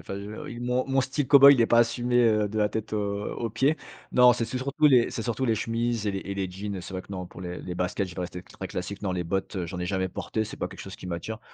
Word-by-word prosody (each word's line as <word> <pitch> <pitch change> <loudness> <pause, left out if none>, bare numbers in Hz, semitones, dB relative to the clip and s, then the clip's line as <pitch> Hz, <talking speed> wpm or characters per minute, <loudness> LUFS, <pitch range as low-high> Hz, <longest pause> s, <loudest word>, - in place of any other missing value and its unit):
enfin, - - -7
heu 100 +2 -7
il 120 0 -7
mon 125 +1 0
mon 135 0 +2
style 135 +2 -2
cow-boy 140 -1 +10
il 130 - +2
est 115 - +5
pas 120 0 +5
assumé, 120 +1 +1
heu, 105 -2 +3
de 110 - -6
la 105 -1 +2
tête 110 0 -4
aux 100 -1 -2
aux 115 -1 -3
pieds. 135 +8 +2 0.4
Non 125 0 +7
c'est 115 -1 -2
c'est 120 - -4
surtout 140 +4 +1
les 125 -4 +5
c'est - - -4
surtout 120 +3 -2
les 115 -3 +2
chemises 115 0 -1
et 100 - +2
les 95 - -3
et 100 - -6
les 95 -2 -2
jeans. 100 +2 -5
Heu, - - -5
c'est 90 +2 -8
vrai 95 - -4
que 100 - -12
non, 90 -1 -5
pour 90 - -11
les 90 -1 -5
les 90 - -6
baskets, 90 +2 -1
je 90 - -10
dois 90 - -3
rester 90 0 -6
très 95 +1 -8
classique. 95 +3 -5
Non 95 -3 -1
les 90 -1 -1
bottes, 95 +4 -3
heu, 90 -2 -2
j'en 90 - -6
n'ai 90 - -3
jamais 95 0 -1
porté. 110 +4 -3
C'est - - -8
pas - - -2
quelque - - -10
chose - - -8
qui - - -10
m'attire. 90 +6 -5
105 Hz, 310 wpm, -27 LUFS, 95-120 Hz, 0.4 s, cow-boy